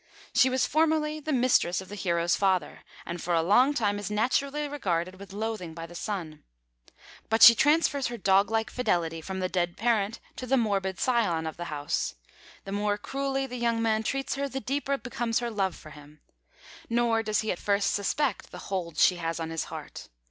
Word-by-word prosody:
She 260 Hz, -1 st, +5 dB
was 260 Hz, -1 st, +1 dB
formerly 310 Hz, -1 st, +1 dB
the 310 Hz, +1 st, -4 dB
mistress 245 Hz, -9 st, +2 dB
of 190 Hz, -, -8 dB
the 205 Hz, -, -10 dB
hero's 170 Hz, -3 st, +1 dB
father, 190 Hz, -2 st, 0 dB, 0.2 s
and 170 Hz, 0 st, -5 dB
for 175 Hz, 0 st, 0 dB
a 165 Hz, -, +2 dB
long 245 Hz, -, +5 dB
time 205 Hz, -4 st, 0 dB
is 205 Hz, -, -5 dB
naturally 275 Hz, +7 st, 0 dB
regarded 185 Hz, -10 st, -2 dB
with 200 Hz, -1 st, -11 dB
loathing 210 Hz, -5 st, -4 dB
by 165 Hz, -1 st, -6 dB
the 170 Hz, -, -12 dB
son. 175 Hz, -5 st, -5 dB, 0.9 s
But 225 Hz, +1 st, +4 dB
she 235 Hz, -, +12 dB
transfers 285 Hz, +1 st, +2 dB
her 240 Hz, 0 st, -5 dB
dog 195 Hz, -1 st, +3 dB
like 225 Hz, -1 st, -1 dB
fidelity 170 Hz, -9 st, -1 dB
from 190 Hz, +3 st, -5 dB
the 185 Hz, -, +1 dB
dead 175 Hz, -1 st, -1 dB
parent 225 Hz, -2 st, 0 dB, 0.2 s
to 255 Hz, -, -6 dB
the 270 Hz, +2 st, +3 dB
morbid 195 Hz, -5 st, 0 dB
scion 215 Hz, -11 st, +1 dB
of 160 Hz, -, -4 dB
the 175 Hz, -, -6 dB
house. 145 Hz, -, -2 dB, 0.5 s
The 195 Hz, -, -8 dB
more 205 Hz, 0 st, 0 dB
cruelly 270 Hz, +4 st, -2 dB
the 250 Hz, -1 st, -6 dB
young 235 Hz, -1 st, +1 dB
man 220 Hz, -1 st, +1 dB
treats 270 Hz, +4 st, -2 dB
her, 280 Hz, 0 st, -2 dB
the 270 Hz, -, -4 dB
deeper 275 Hz, +3 st, -1 dB
becomes 240 Hz, -3 st, -2 dB
her 240 Hz, -1 st, -2 dB
love 195 Hz, -4 st, -1 dB
for 155 Hz, -, -13 dB
him. 150 Hz, 0 st, -15 dB, 0.7 s
Nor 235 Hz, -1 st, +2 dB
does 215 Hz, -1 st, 0 dB
he 220 Hz, -, -1 dB
at 175 Hz, -, -4 dB
first 200 Hz, 0 st, +1 dB
suspect 215 Hz, +4 st, -1 dB
the -, -, -10 dB
hold 175 Hz, -4 st, -3 dB
she 180 Hz, -, +5 dB
has 165 Hz, -1 st, -3 dB
on 165 Hz, 0 st, -4 dB
his 165 Hz, -2 st, -2 dB
heart. -, -, -9 dB
210 Hz, 200 wpm, -28 LUFS, 180-250 Hz, 0.9 s, she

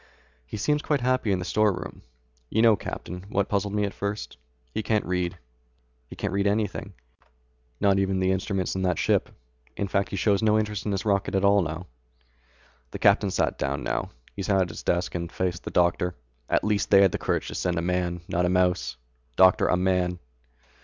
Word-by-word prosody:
"He -, -, -6 dB
seems 150 Hz, +8 st, +1 dB
quite 145 Hz, -3 st, 0 dB
happy 130 Hz, -3 st, +1 dB
in 95 Hz, -, +2 dB
the 90 Hz, -, -4 dB
storeroom. 105 Hz, 0 st, 0 dB, 0.5 s
You 110 Hz, -, +2 dB
know, 115 Hz, -2 st, +7 dB
Captain, 90 Hz, -1 st, -7 dB
what 100 Hz, -1 st, 0 dB
puzzled 100 Hz, 0 st, -1 dB
me 105 Hz, -, +1 dB
at 100 Hz, -, -2 dB
first? 100 Hz, -5 st, -4 dB, 0.4 s
He 110 Hz, -, -1 dB
can't 110 Hz, -1 st, 0 dB
read. 90 Hz, -1 st, -1 dB, 0.7 s
He -, -, -9 dB
can't -, -, -3 dB
read 100 Hz, +1 st, +1 dB
anything, 100 Hz, -1 st, -1 dB, 0.9 s
not 100 Hz, -1 st, +3 dB
even 95 Hz, -1 st, 0 dB
the 95 Hz, 0 st, +2 dB
instruments 95 Hz, -1 st, -1 dB
in 95 Hz, -, -2 dB
that 90 Hz, -3 st, +1 dB
ship. -, -, +1 dB, 0.5 s
In 100 Hz, -, -1 dB
fact 100 Hz, -1 st, 0 dB
he -, -, -4 dB
shows 100 Hz, +2 st, +2 dB
no 110 Hz, -1 st, +3 dB
interest 105 Hz, -1 st, -2 dB
in -, -, 0 dB
his 100 Hz, +2 st, -2 dB
rocket 100 Hz, -2 st, +1 dB
at 95 Hz, 0 st, +2 dB
all." 90 Hz, -4 st, +2 dB, 1.0 s
The -, -, -6 dB
captain 100 Hz, 0 st, +4 dB
sat -, -, 0 dB
down 70 Hz, 0 st, -2 dB
now. -, -, -2 dB, 0.3 s
He 100 Hz, -, -4 dB
sat 95 Hz, 0 st, +2 dB
at 90 Hz, -2 st, +1 dB
the 80 Hz, -, -7 dB
desk 85 Hz, +1 st, 0 dB
and 85 Hz, -1 st, -4 dB
faced 90 Hz, -2 st, -2 dB
the -, -, -3 dB
doctor. 90 Hz, 0 st, +1 dB, 0.3 s
"At -, -, +2 dB
least 105 Hz, -1 st, 0 dB
they 100 Hz, -1 st, +7 dB
had 95 Hz, -, +4 dB
the -, -, -3 dB
courage -, -, -1 dB
to -, -, -6 dB
send 90 Hz, -2 st, -1 dB
a 85 Hz, -, -1 dB
man, 90 Hz, -1 st, -1 dB
not 90 Hz, +1 st, +1 dB
a -, -, 0 dB
mouse. 90 Hz, -7 st, +1 dB, 0.4 s
Doctor, 95 Hz, -1 st, +5 dB
a 90 Hz, -, +2 dB
man." 90 Hz, -1 st, +1 dB
95 Hz, 200 wpm, -26 LUFS, 90-105 Hz, 1.0 s, know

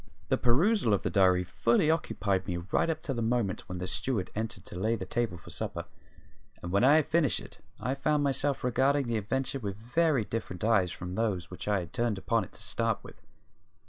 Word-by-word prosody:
The -, -, +3 dB
perusal 135 Hz, -, +3 dB
of -, -, -4 dB
the -, -, -1 dB
diary 95 Hz, -2 st, +4 dB
fully 115 Hz, -, +2 dB
occupied 100 Hz, -, -1 dB
me 90 Hz, -3 st, -1 dB
right 95 Hz, -, 0 dB
up 160 Hz, -1 st, -2 dB
to 150 Hz, -5 st, -2 dB
the 120 Hz, -, -2 dB
moment 115 Hz, -4 st, -1 dB
when 90 Hz, -, -4 dB
the 90 Hz, -, -3 dB
steward 100 Hz, +1 st, -2 dB
entered 110 Hz, +2 st, -4 dB
to -, -, -8 dB
lay 110 Hz, +4 st, +1 dB
the -, -, -5 dB
table 115 Hz, -6 st, -1 dB
for 85 Hz, -, -9 dB
supper; -, -, -3 dB, 0.8 s
and 85 Hz, -, -4 dB
when 100 Hz, +4 st, +3 dB
I 140 Hz, +4 st, +7 dB
had 155 Hz, -, +4 dB
finished 155 Hz, -4 st, +2 dB
it -, -, -11 dB, 0.2 s
I 125 Hz, -, -1 dB
found 150 Hz, +1 st, +1 dB
myself 140 Hz, 0 st, 0 dB
regarding 135 Hz, +3 st, +2 dB
the 120 Hz, -1 st, 0 dB
adventure 135 Hz, +6 st, -2 dB
with 100 Hz, -5 st, -4 dB
very 125 Hz, +2 st, +1 dB
different 100 Hz, -5 st, -4 dB
eyes 100 Hz, -6 st, +3 dB
from 90 Hz, -1 st, -6 dB
those 95 Hz, -5 st, -1 dB
which 90 Hz, -, -7 dB
I 100 Hz, -2 st, +2 dB
had 85 Hz, -, -10 dB
turned 120 Hz, -4 st, 0 dB
upon -, -, +1 dB
it -, -, -12 dB
to -, -, -8 dB
start -, -, 0 dB
with. -, -, -13 dB
115 Hz, 215 wpm, -30 LUFS, 95-135 Hz, 0.8 s, I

